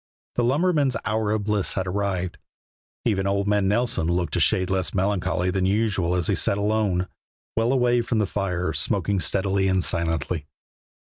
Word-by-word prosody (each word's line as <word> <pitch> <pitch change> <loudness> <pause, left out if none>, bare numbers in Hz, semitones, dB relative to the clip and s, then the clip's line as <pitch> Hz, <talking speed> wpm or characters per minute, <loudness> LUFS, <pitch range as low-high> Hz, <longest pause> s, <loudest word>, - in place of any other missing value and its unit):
The 120 - 0
lumberman's 145 +1 +2
hour 110 -1 0
of 105 0 0
bliss 105 -2 0
had 95 - -1
arrived. 95 -2 -2 0.7
Even 100 -4 +1
old 100 +1 0
man 105 -1 +2
Nelson 115 -4 0
looked 85 -2 -1
a - - +1
shade 95 0 +2
less 95 0 -1
melancholy 90 -1 0
than 95 0 0
usual 100 -4 +1
as 90 -2 0
he - - +1
sat 100 - +2
alone, 100 -3 0 0.5
well 115 +2 +2
away 125 -2 +3
from 115 0 -2
the 105 - +2
fire, 95 -3 -2
smoking 100 -2 0
steadily 95 +1 +1
and 95 -1 +2
silently. 80 -2 -1
100 Hz, 165 wpm, -24 LUFS, 90-110 Hz, 0.7 s, away